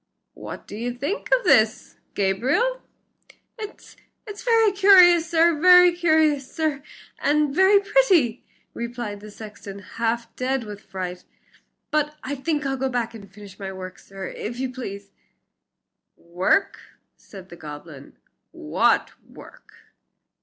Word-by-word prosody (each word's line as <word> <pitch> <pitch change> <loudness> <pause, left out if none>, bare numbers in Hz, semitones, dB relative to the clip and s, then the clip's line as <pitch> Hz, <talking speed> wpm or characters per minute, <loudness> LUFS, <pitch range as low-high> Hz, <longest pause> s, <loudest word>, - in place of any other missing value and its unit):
"What - - -9
do - - -9
you 240 +3 -4
think 285 - -4
of - - +3
this, 220 - +2 0.2
Gabriel?" 265 - 0 0.8
"It's 425 -1 -10 0.3
it's 415 -1 -9
very 455 -3 +3
curious, 365 -4 +6
sir, 335 -2 +3
very 360 0 +8
curious, 315 -5 +1
sir, 310 -3 -2 0.4
and 295 0 +1
very 380 +5 +5
pretty," 385 - +2 0.3
replied 235 -3 -5
the 210 +1 -11
sexton, 205 -2 -10
half 230 +3 -4
dead 260 0 -1
with 205 -2 -9
fright. 180 -1 -6 0.7
"But 300 0 0
I 275 - -4
think 295 +1 -2
I'll 270 0 -1
go 265 +1 -1
back 235 -2 -2
and 200 -4 -12
finish 200 -1 -14
my 195 -1 -5
work, 185 -1 -9
sir, 195 -1 -9
if 240 +3 -6
you 260 -1 -3
please." 200 -5 -8 1.1
"Work!" 180 - 0 0.4
said 190 -2 -14
the 175 - -10
goblin, 150 -2 -11 0.3
"what 75 - 0 0.2
work?" - - -15
255 Hz, 130 wpm, -23 LUFS, 200-340 Hz, 1.1 s, very